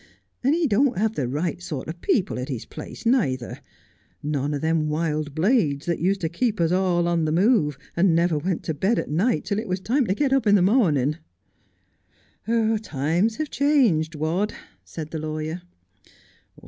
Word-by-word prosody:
And 275 Hz, +5 st, +3 dB
he 340 Hz, -1 st, +1 dB
don't 250 Hz, -2 st, +2 dB
have 220 Hz, +2 st, +1 dB
the 135 Hz, -, -2 dB
right 160 Hz, +7 st, -2 dB
sort 150 Hz, -6 st, -5 dB
of 170 Hz, +2 st, -7 dB
people 190 Hz, -, 0 dB
at 125 Hz, -, -5 dB
his 125 Hz, -5 st, -4 dB
place, -, -, -10 dB
neither, 135 Hz, -, 0 dB, 0.4 s
— -, -, -38 dB, 0.2 s
none 145 Hz, 0 st, -1 dB
o' -, -, 0 dB
them 160 Hz, +1 st, 0 dB
wild 155 Hz, -2 st, -2 dB
blades 160 Hz, -, +1 dB
that 170 Hz, -1 st, -1 dB
used 190 Hz, +3 st, 0 dB
to 165 Hz, -, 0 dB
keep 210 Hz, +6 st, -1 dB
us 165 Hz, 0 st, +2 dB
all 180 Hz, -2 st, +2 dB
on 170 Hz, -2 st, +1 dB
the 155 Hz, -, 0 dB
move 170 Hz, -, +2 dB, 0.2 s
and 170 Hz, -1 st, +3 dB
never 170 Hz, -2 st, +2 dB
went 180 Hz, +2 st, -2 dB
to 160 Hz, -, -2 dB
bed 195 Hz, +10 st, +1 dB
at -, -, -3 dB
night 205 Hz, +10 st, +1 dB
till 205 Hz, 0 st, -1 dB
it 225 Hz, -, -5 dB
was 185 Hz, 0 st, -1 dB
time 235 Hz, +7 st, 0 dB
to 190 Hz, -, +1 dB
get 275 Hz, +1 st, +1 dB
up 270 Hz, -5 st, +2 dB
in 205 Hz, -, +6 dB
the 190 Hz, -, +4 dB
mornin'.' 165 Hz, -, +2 dB, 0.7 s
' 225 Hz, -1 st, -3 dB
Times 170 Hz, +6 st, 0 dB
have 310 Hz, +2 st, -4 dB
changed, 235 Hz, -, +2 dB
Wadd,' 165 Hz, +8 st, -1 dB, 0.3 s
said 155 Hz, -, -8 dB
the 160 Hz, -, -4 dB
lawyer. 155 Hz, +2 st, -4 dB
175 Hz, 190 wpm, -24 LUFS, 155-220 Hz, 0.7 s, in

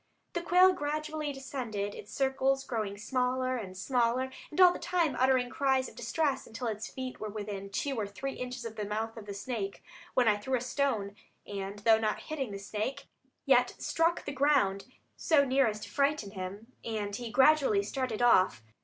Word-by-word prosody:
The 345 Hz, -, -1 dB
quail 365 Hz, +2 st, +6 dB
gradually 305 Hz, 0 st, -3 dB
descended, 240 Hz, -7 st, -4 dB
its 205 Hz, -, -10 dB
circles 270 Hz, 0 st, +1 dB
growing 215 Hz, -6 st, -3 dB
smaller 255 Hz, +3 st, 0 dB
and 190 Hz, -5 st, -7 dB
smaller 250 Hz, +4 st, +1 dB, 0.2 s
and 305 Hz, -, -6 dB
all 360 Hz, -1 st, +8 dB
the -, -, -6 dB
time 340 Hz, -5 st, +1 dB
uttering 255 Hz, -1 st, +3 dB
cries 265 Hz, -2 st, +1 dB
of -, -, -13 dB
distress, 270 Hz, +4 st, -1 dB
until 230 Hz, +3 st, -6 dB
its 220 Hz, -1 st, -3 dB
feet 260 Hz, -1 st, -6 dB
were 215 Hz, -, -4 dB
within 200 Hz, -2 st, -5 dB
two 265 Hz, +5 st, -2 dB
or 205 Hz, -, -1 dB
three 270 Hz, +7 st, -5 dB
inches 250 Hz, -1 st, -6 dB
of 225 Hz, -1 st, -7 dB
the 210 Hz, -, -2 dB
mouth 220 Hz, +2 st, -3 dB
of 220 Hz, -3 st, -10 dB
the 200 Hz, -, -4 dB
snake; 200 Hz, -2 st, -4 dB, 0.3 s
when 250 Hz, -2 st, +4 dB
I 210 Hz, -1 st, +4 dB
threw 260 Hz, +6 st, -1 dB
a -, -, -4 dB
stone, 245 Hz, -6 st, -1 dB, 0.3 s
and 200 Hz, 0 st, -5 dB
though 220 Hz, +1 st, +4 dB
not 215 Hz, -1 st, -1 dB
hitting 280 Hz, -6 st, -4 dB
the 200 Hz, -, -5 dB
snake, 215 Hz, +8 st, -4 dB, 0.4 s
yet 250 Hz, -2 st, +4 dB
struck 330 Hz, +1 st, 0 dB
the -, -, -3 dB
ground 260 Hz, -9 st, +2 dB, 0.3 s
so 295 Hz, -4 st, +4 dB
near 265 Hz, -1 st, +3 dB
as 210 Hz, -1 st, -2 dB
to -, -, -7 dB
frighten 280 Hz, -7 st, +1 dB
him, 200 Hz, +4 st, -7 dB
and 210 Hz, -3 st, -3 dB
he 240 Hz, +1 st, -5 dB
gradually 265 Hz, -5 st, +5 dB
started 245 Hz, +1 st, -2 dB
off. 185 Hz, -, +4 dB
245 Hz, 190 wpm, -31 LUFS, 210-275 Hz, 0.4 s, all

